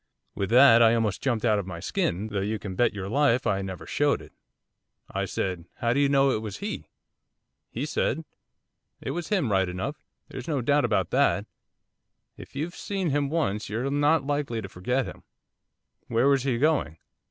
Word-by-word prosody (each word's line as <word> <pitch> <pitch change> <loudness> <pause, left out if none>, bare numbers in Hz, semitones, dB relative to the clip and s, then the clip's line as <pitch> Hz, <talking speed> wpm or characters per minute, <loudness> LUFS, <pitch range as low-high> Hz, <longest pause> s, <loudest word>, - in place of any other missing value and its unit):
With 100 -2 -2
that 120 0 +7
I 115 0 +6
almost 110 -4 0
jumped 120 -4 0
out 105 -3 +3
of 95 - -5
my 85 -3 -6
skin, 95 +4 -1
though 100 -2 -2
you 105 +3 -1
can 100 -2 -6
bet 120 +6 +2
your 100 -2 -5
life 130 +1 +2
I 100 -1 +1
never 95 -2 -6
showed - - +1
it. - - -14 0.8
I 100 0 -1
said, 90 -3 -3
"How 120 -1 0
do 140 - +1
you 140 -1 +3
know 135 -1 +4
it 110 - -1
was 105 -3 -6
he?" - - -5 0.8
He 130 +5 -3
said, 160 +1 -1 0.7
"It - - -4
was 170 +3 -4
him 185 - +1
right 95 -2 +2
enough, 95 +12 -5 0.2
there's 130 -2 -8
no 150 -4 0
doubt 145 +3 +3
about 105 -7 0
that. - - +2 0.9
If - - -13
you've 160 +5 -3
seen 190 -5 -2
him 140 0 +1
once, 125 -12 -1
you're 120 +6 -2
not 145 +1 +3
likely 145 -5 -1
to 100 - -6
forget 125 +8 -1
him." - - -9 0.9
"Where 120 +3 +2
was 140 -1 +4
he 130 -2 0
going?" 140 - +1
120 Hz, 190 wpm, -26 LUFS, 100-140 Hz, 0.9 s, that